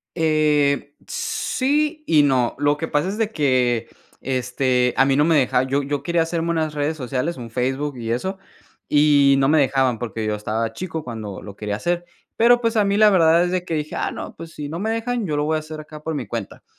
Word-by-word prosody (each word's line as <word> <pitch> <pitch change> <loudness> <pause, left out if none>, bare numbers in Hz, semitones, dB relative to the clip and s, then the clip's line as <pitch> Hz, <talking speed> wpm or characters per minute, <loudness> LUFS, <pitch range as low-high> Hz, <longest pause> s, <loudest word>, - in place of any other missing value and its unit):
Eh, 150 -3 +1
sí 300 +4 -1
y 155 - +5
no, 130 -4 +1
lo 145 +1 +2
que 160 +2 -4
pasa 150 +5 0
es 200 - -3
de 220 -2 0
que, 125 - +1 0.3
este, 125 -1 0
a - - +5
mí 135 0 +2
no 150 - +4
me 165 -1 +3
deja 130 -2 +3
yo 135 +2 0
yo 140 0 -2
quería 170 +2 +1
hacerme 165 0 -2
unas 155 -2 -1
redes 150 +2 -1
sociales, 135 +4 -3
un 120 -2 -8
Facebook 130 +4 -2
y 115 -2 -5
eso, 190 +12 -2 0.5
y 145 -2 +5
no 135 - +3
me 155 - +4
dejaban 130 -3 +2
porque 110 -2 -4
yo 105 - 0
estaba 110 +2 -2
chico 160 +2 -5
cuando 110 -5 -6
lo 100 - -9
quería 105 -1 -3
hacer. 175 +7 -1 0.3
Pero, 240 +1 +5
pues 230 -1 0
a 210 - +4
mí 200 0 +1
la 215 0 +6
verdad 170 -2 +4
es 175 - -1
de 180 -1 -1
que 165 - -3
dije: 150 0 -3
"Ah - - -1
no, - - -7
pues 165 0 -10
si 150 -2 -6
no 160 +3 -5
me 220 +2 -1
dejan, 230 0 -2
yo 150 -3 -1
lo 145 - 0
voy 155 +1 +1
a - - -1
hacer 155 0 -9
acá 150 0 -11
por 160 +1 -3
mi 130 -5 -4
cuenta". 110 -1 -6
150 Hz, 230 wpm, -21 LUFS, 130-170 Hz, 0.5 s, la